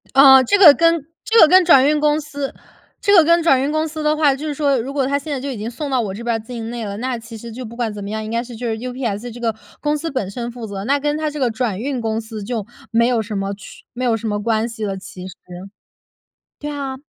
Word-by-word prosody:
呃， 265 Hz, -1 st, +8 dB
这 335 Hz, +11 st, +2 dB
个 345 Hz, -8 st, +9 dB
跟 330 Hz, -1 st, +2 dB, 0.2 s
这 455 Hz, +1 st, +3 dB
个 320 Hz, -, +9 dB
跟 370 Hz, +3 st, +6 dB
转 275 Hz, -6 st, +6 dB
运 300 Hz, 0 st, +2 dB
公 300 Hz, 0 st, +2 dB
司 285 Hz, -2 st, -5 dB, 0.5 s
这 405 Hz, -, +3 dB
个 345 Hz, -, +8 dB
跟 335 Hz, +2 st, +4 dB
转 270 Hz, -6 st, +4 dB
运 280 Hz, +2 st, -1 dB
公 310 Hz, +1 st, 0 dB
司 310 Hz, 0 st, -6 dB
的 300 Hz, 0 st, +2 dB
话 295 Hz, -3 st, +3 dB
就 295 Hz, +3 st, -6 dB
是 300 Hz, -, -2 dB
说 280 Hz, -2 st, +1 dB
如 260 Hz, +4 st, -5 dB
果 275 Hz, -2 st, 0 dB
它 280 Hz, +2 st, +1 dB
现 295 Hz, +2 st, -7 dB
在 280 Hz, -, -2 dB
就 280 Hz, +2 st, -5 dB
已 250 Hz, -, -6 dB
经 215 Hz, +2 st, -4 dB
送 280 Hz, +5 st, -5 dB
到 260 Hz, -2 st, +2 dB
我 200 Hz, -4 st, -4 dB
这 220 Hz, +4 st, -8 dB
边 235 Hz, -1 st, 0 dB
儿 -, -, -2 dB
境 225 Hz, 0 st, -7 dB
内 235 Hz, -1 st, -5 dB
了， 200 Hz, -1 st, -5 dB
那 250 Hz, +2 st, -2 dB
其 225 Hz, 0 st, -10 dB
实 230 Hz, +1 st, -9 dB
就 250 Hz, +3 st, -7 dB
不 230 Hz, +1 st, -10 dB
管 235 Hz, -3 st, -2 dB
怎 205 Hz, -1 st, -7 dB
么 200 Hz, -, -6 dB
样， 220 Hz, +1 st, -3 dB
应 215 Hz, -, -6 dB
该 230 Hz, +1 st, -1 dB
是 245 Hz, -1 st, -10 dB
就 240 Hz, +2 st, -4 dB
是 220 Hz, -1 st, -2 dB
UPS 245 Hz, -2 st, -4 dB
这 240 Hz, -, -10 dB
个 230 Hz, -2 st, -1 dB, 0.2 s
公 300 Hz, 0 st, 0 dB
司 325 Hz, +2 st, -4 dB
本 255 Hz, -9 st, -2 dB
身 235 Hz, +4 st, -5 dB
负 235 Hz, -1 st, -8 dB
责， 195 Hz, -1 st, -6 dB
那 280 Hz, +6 st, +1 dB
跟 295 Hz, +1 st, -1 dB
它 310 Hz, 0 st, -1 dB
这 300 Hz, 0 st, -7 dB
个 255 Hz, -3 st, +2 dB
转 220 Hz, -4 st, -2 dB
运 260 Hz, +1 st, -3 dB
公 220 Hz, -1 st, -1 dB
司 220 Hz, -2 st, -7 dB
就 220 Hz, -1 st, -3 dB, 0.3 s
没 235 Hz, 0 st, +3 dB
有 245 Hz, -2 st, +1 dB
什 210 Hz, -1 st, -5 dB
么 195 Hz, 0 st, -2 dB
去 200 Hz, -, -13 dB
没 250 Hz, +1 st, -5 dB
有 235 Hz, -3 st, +2 dB
什 225 Hz, -, -5 dB
么 205 Hz, -1 st, -2 dB
关 225 Hz, +1 st, 0 dB
系 225 Hz, -2 st, -7 dB
了 195 Hz, -2 st, -2 dB
其 185 Hz, -1 st, -9 dB
实。 185 Hz, -, -9 dB, 1.3 s
对 295 Hz, -, -5 dB
啊， 275 Hz, -2 st, -4 dB
245 Hz, 320 characters per minute, -19 LUFS, 225-290 Hz, 1.3 s, 个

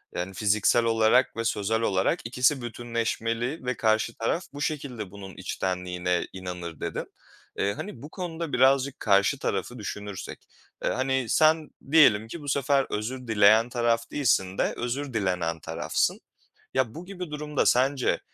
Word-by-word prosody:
yani, 90 Hz, +2 st, -3 dB
"Fiziksel 105 Hz, +4 st, +3 dB
olarak 115 Hz, +2 st, +3 dB
ve 115 Hz, -, -1 dB
sözel 110 Hz, +1 st, 0 dB
olarak 95 Hz, -4 st, +1 dB
ikisi 125 Hz, +3 st, +2 dB
bütünleşmeli 120 Hz, +3 st, -2 dB
ve 125 Hz, -2 st, -1 dB
karşı 110 Hz, 0 st, +2 dB
taraf 165 Hz, +10 st, -1 dB
bu 145 Hz, -, -7 dB
şekilde 125 Hz, -11 st, -3 dB
bunun 95 Hz, -2 st, -10 dB
içtenliğine 90 Hz, -1 st, -2 dB
inanır." 90 Hz, -4 st, -6 dB
dedin. -, -, -3 dB, 0.5 s
Eee, 100 Hz, +1 st, +1 dB
hani, 195 Hz, -, -7 dB
bu 145 Hz, -, -9 dB
konuda 165 Hz, -5 st, -5 dB
birazcık 135 Hz, +1 st, +3 dB
karşı 100 Hz, -2 st, +3 dB
tarafı -, -, -3 dB
düşünürsek. 105 Hz, -2 st, -7 dB, 0.4 s
Eee, -, -, +1 dB
hani, 130 Hz, -1 st, 0 dB
sen 155 Hz, +2 st, +3 dB, 0.2 s
diyelim 115 Hz, -9 st, +6 dB
ki 165 Hz, +7 st, -7 dB
bu 145 Hz, -, -9 dB
sefer 140 Hz, 0 st, +2 dB
özür 125 Hz, +4 st, -4 dB
dileyen 110 Hz, +2 st, +5 dB
taraf 115 Hz, -1 st, 0 dB
değilsin 95 Hz, -9 st, +1 dB
de -, -, +1 dB
özür 130 Hz, +2 st, -3 dB
dilenen 90 Hz, -6 st, -1 dB
tarafsın. 80 Hz, 0 st, -1 dB, 0.5 s
Ya, 130 Hz, -2 st, 0 dB
bu 175 Hz, +2 st, -8 dB
gibi 180 Hz, -4 st, -7 dB
durumda 150 Hz, -1 st, -1 dB
sence 130 Hz, +1 st, +2 dB
115 Hz, 145 wpm, -26 LUFS, 100-135 Hz, 0.5 s, diyelim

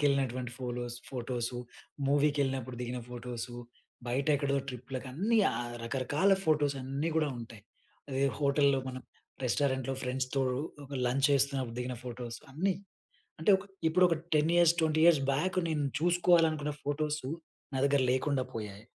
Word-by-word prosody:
మాల్‌కి -, -, -4 dB
వెళ్ళినటువంటి 130 Hz, -3 st, 0 dB
ఫోలోస్ 120 Hz, -1 st, -4 dB
ఫోటోసు, 125 Hz, -1 st, -3 dB, 0.5 s
మూవీకి 145 Hz, +1 st, +3 dB
వెళ్ళినప్పుడు 130 Hz, -2 st, -2 dB
దిగిన 125 Hz, +1 st, -3 dB
ఫోటోసు, 120 Hz, 0 st, -6 dB, 0.5 s
బయట 130 Hz, +3 st, 0 dB
ఎక్కడో 140 Hz, -1 st, 0 dB
ట్రిప్‌ల 125 Hz, +1 st, -6 dB
కన్ని, 195 Hz, -, +1 dB
ఆహ్, 120 Hz, 0 st, -4 dB
రకరకాల 145 Hz, +10 st, +2 dB
ఫోటోస్ 150 Hz, -3 st, +2 dB
అన్నీ 140 Hz, +5 st, -2 dB
కూడా 155 Hz, -2 st, +2 dB
ఉంటాయి. 115 Hz, -3 st, -9 dB, 0.5 s
అదే 135 Hz, +1 st, 0 dB, 0.2 s
హోటల్‌లో 140 Hz, -1 st, +3 dB
మనం, 130 Hz, 0 st, -6 dB, 0.4 s
రెస్టారెంట్‌లో 130 Hz, +1 st, +1 dB
ఫ్రెండ్స్‌తో 130 Hz, +1 st, -1 dB, 0.4 s
ఒక 140 Hz, -, -8 dB
లంచ్ 135 Hz, +3 st, +3 dB
చేస్తున్నప్పుడు 135 Hz, -3 st, +1 dB
దిగిన 125 Hz, 0 st, -3 dB
ఫోటోస్, 120 Hz, -1 st, -6 dB
అన్నీ. 185 Hz, +6 st, +1 dB, 0.7 s
అంటే, 160 Hz, +6 st, +4 dB
ఒక 190 Hz, -, -10 dB, 0.2 s
ఇప్పుడు 180 Hz, +3 st, +4 dB
ఒక 165 Hz, -, +2 dB, 0.2 s
10 150 Hz, +2 st, +3 dB
ఇయర్స్ 170 Hz, -1 st, +6 dB
20 155 Hz, 0 st, +2 dB
ఇయర్స్ 165 Hz, -5 st, +6 dB
బ్యాక్ 180 Hz, +7 st, 0 dB
నేను 150 Hz, -3 st, 0 dB, 0.2 s
చూసుకోవాలనుకున్న 165 Hz, -4 st, +3 dB
ఫోటోసు, 150 Hz, -1 st, -1 dB, 0.4 s
నా -, -, -1 dB
దగ్గర 140 Hz, -1 st, +3 dB
లేకుండా 130 Hz, 0 st, +1 dB
పోయాయి. 105 Hz, -1 st, -6 dB
135 Hz, 140 wpm, -31 LUFS, 125-150 Hz, 0.7 s, ఇయర్స్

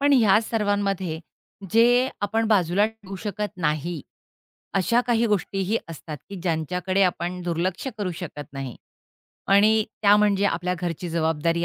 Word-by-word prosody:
पण 285 Hz, 0 st, +3 dB
या 215 Hz, -6 st, +6 dB
सर्वांमध्ये 200 Hz, -6 st, -1 dB, 0.5 s
जे 245 Hz, +4 st, +5 dB
आपण 220 Hz, +2 st, 0 dB
बाजूला 195 Hz, -1 st, +3 dB
ठेवू 215 Hz, -3 st, -9 dB
शकत 210 Hz, 0 st, -3 dB
नाही, 160 Hz, 0 st, -1 dB, 0.7 s
अशा 195 Hz, +5 st, +3 dB
काही 235 Hz, -1 st, +2 dB
गोष्टीही 200 Hz, 0 st, 0 dB
असतात 160 Hz, -1 st, -7 dB
की 200 Hz, -, -7 dB
ज्यांच्याकडे 180 Hz, +3 st, 0 dB
आपण 180 Hz, 0 st, 0 dB
दुर्लक्ष 175 Hz, +6 st, -2 dB
करू 200 Hz, -3 st, -1 dB
शकत 150 Hz, -6 st, -8 dB
नाही 135 Hz, -2 st, -6 dB, 0.7 s
आणि 215 Hz, +2 st, +5 dB, 0.2 s
त्या 205 Hz, 0 st, +7 dB
म्हणजे 205 Hz, -1 st, +3 dB
आपल्या 180 Hz, 0 st, -1 dB
घरची 175 Hz, 0 st, -3 dB
जबाबदारी 165 Hz, +1 st, 0 dB
195 Hz, 135 wpm, -24 LUFS, 170-210 Hz, 0.7 s, त्या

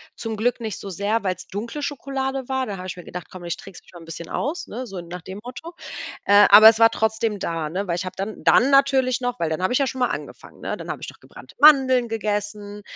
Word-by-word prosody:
zum 225 Hz, -1 st, -5 dB
Glück 245 Hz, +4 st, 0 dB
nicht 220 Hz, -4 st, -5 dB
so 200 Hz, -, -7 dB
sehr, 205 Hz, +5 st, -1 dB
weil's 185 Hz, -2 st, -3 dB
dunkle 230 Hz, +9 st, -5 dB
Schokolade 270 Hz, -2 st, -3 dB
war, 265 Hz, -1 st, -1 dB
da 200 Hz, -, -5 dB
habe 180 Hz, -, -8 dB
ich 180 Hz, -, -6 dB
mir 180 Hz, -, -9 dB
gedacht: 180 Hz, -1 st, -8 dB
„Komm, 180 Hz, -2 st, -10 dB
ich 170 Hz, 0 st, -3 dB
trickse 195 Hz, -2 st, -12 dB
mich -, -, -21 dB
mal 175 Hz, -, -11 dB
'n -, -, -13 dB
bisschen 165 Hz, 0 st, -8 dB
aus“, 320 Hz, +5 st, -3 dB
ne, 250 Hz, +4 st, -6 dB
so 195 Hz, -4 st, -7 dB
nach 175 Hz, +1 st, -8 dB
dem 190 Hz, +3 st, -8 dB
Motto. 255 Hz, +8 st, -9 dB, 0.5 s
Äh, 205 Hz, +1 st, +7 dB
aber 215 Hz, +2 st, +11 dB
es 220 Hz, -, -3 dB
war 225 Hz, 0 st, +7 dB
trotzdem 220 Hz, -1 st, -1 dB
da, 165 Hz, -4 st, -3 dB
ne, 190 Hz, +5 st, -3 dB
weil 170 Hz, -, 0 dB
ich 175 Hz, -, -4 dB
habe 185 Hz, -, -6 dB
dann 200 Hz, +3 st, -5 dB
dann 260 Hz, +4 st, +5 dB
natürlich 270 Hz, -2 st, +3 dB
noch 245 Hz, -1 st, -3 dB
weil 165 Hz, -, 0 dB
dann 160 Hz, +3 st, -3 dB
habe 185 Hz, -, +1 dB
ich -, -, +4 dB
ja 275 Hz, -, +2 dB
schon 260 Hz, -, -5 dB
mal 250 Hz, -, +3 dB
angefangen, -, -, -8 dB
ne? -, -, -3 dB
Dann -, -, -9 dB
habe -, -, -5 dB
ich -, -, -6 dB
noch -, -, -21 dB
gebrannte -, -, -15 dB
Mandeln 260 Hz, -5 st, +6 dB
gegessen, 210 Hz, -1 st, -4 dB
220 Hz, 265 wpm, -22 LUFS, 185-255 Hz, 0.5 s, aber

